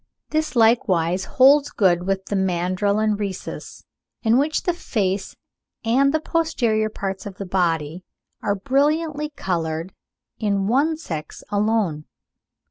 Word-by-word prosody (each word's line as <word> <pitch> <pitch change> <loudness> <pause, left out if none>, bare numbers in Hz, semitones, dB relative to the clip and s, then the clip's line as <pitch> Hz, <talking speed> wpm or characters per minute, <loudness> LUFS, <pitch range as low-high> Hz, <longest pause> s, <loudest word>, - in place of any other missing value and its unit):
This 310 -3 -1
likewise 190 -6 +3
holds 280 +2 +5
good 180 -3 +2
with 195 0 -1
the 205 - -3
mandrill 185 +2 0
and 215 -1 +1
Rhesus, 195 -3 -6 0.4
in 230 +2 +4
which 305 +2 0
the 355 - +1
face 200 - -2 0.5
and 270 +5 +3
the 315 - +1
posterior 240 -10 0
parts 195 -2 -5
of 195 - -8
the 200 - -5
body 170 -2 -1 0.4
are 200 - 0
brilliantly 295 +6 0
coloured 165 -1 -3 0.5
in 200 -3 0
one 285 +9 +2
sex 160 - -7
alone. 205 -7 0
205 Hz, 130 wpm, -22 LUFS, 185-265 Hz, 0.5 s, holds